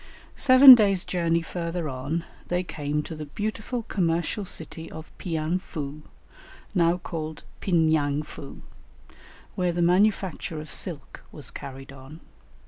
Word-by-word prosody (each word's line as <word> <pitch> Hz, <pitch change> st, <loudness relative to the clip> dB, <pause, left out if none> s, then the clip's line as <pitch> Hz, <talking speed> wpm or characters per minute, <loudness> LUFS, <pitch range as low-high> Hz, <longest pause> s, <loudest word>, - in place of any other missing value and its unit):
] -, -, -24 dB
Seven 260 Hz, 0 st, +10 dB
days' 200 Hz, -6 st, +4 dB
journey 170 Hz, -2 st, 0 dB
further 170 Hz, -1 st, -4 dB
on 140 Hz, +5 st, -3 dB, 0.2 s
they 180 Hz, +1 st, 0 dB
came 150 Hz, -3 st, -3 dB
to 165 Hz, -, -7 dB
the 155 Hz, -1 st, -7 dB
beautiful 215 Hz, -, -4 dB
commercial 175 Hz, 0 st, -1 dB
city 165 Hz, -1 st, -8 dB
of 160 Hz, 0 st, -10 dB
Pianfou, 155 Hz, -3 st, -3 dB, 0.7 s
now 170 Hz, -2 st, +3 dB
called 160 Hz, -3 st, -6 dB, 0.2 s
Pin 170 Hz, -4 st, +2 dB
yang 150 Hz, -2 st, +1 dB
foo, 140 Hz, -2 st, -11 dB, 0.9 s
where 180 Hz, -1 st, 0 dB
the 175 Hz, 0 st, 0 dB
manufacture 185 Hz, -3 st, +1 dB
of 155 Hz, 0 st, -9 dB
silk 160 Hz, -9 st, -5 dB
was -, -, -4 dB
carried 135 Hz, 0 st, -9 dB
on. 135 Hz, +3 st, -12 dB
165 Hz, 135 wpm, -26 LUFS, 155-180 Hz, 0.9 s, Seven